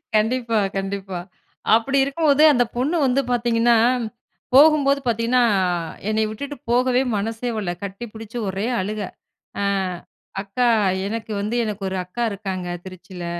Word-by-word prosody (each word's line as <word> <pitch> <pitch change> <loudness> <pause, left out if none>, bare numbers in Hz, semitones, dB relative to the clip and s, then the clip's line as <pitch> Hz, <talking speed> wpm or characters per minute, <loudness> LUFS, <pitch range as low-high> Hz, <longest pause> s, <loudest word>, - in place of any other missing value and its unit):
கண்டிப்பா, 230 +1 +1 0.2
கண்டிப்பா. 195 -1 -4 0.6
அப்படி 270 +5 +1
இருக்கும்போது, 285 +1 +3
அந்த 245 -2 +4
பொண்ணு 275 +7 0
வந்து 260 +1 +2
பாத்தீங்கன்னா, 235 -1 +3 0.8
போகும்போது 285 -1 +6
பாத்தீங்கன்னா, 235 +2 +2 0.7
என்னய 215 0 +1
விட்டுட்டு 280 +7 -6
போகவே 250 +1 +3 0.2
மனசே 225 +4 -3
வல்ல. 195 -5 -2
கட்டிப்புடுச்சு 220 +3 -7
ஒரே 195 +3 -2 0.2
அழுக. 210 +3 -3 0.6
அ - - 0 0.8
அக்கா, 210 +5 0 0.4
"எனக்கு 225 +1 -5
வந்து 210 +4 -2
எனக்கு 210 -2 -4
ஒரு 190 - -3
அக்கா 185 +7 -4
இருக்காங்க, 190 -3 -4 0.2
திருச்சியில. 185 -1 -9
225 Hz, 120 wpm, -22 LUFS, 200-250 Hz, 0.8 s, போகும்போது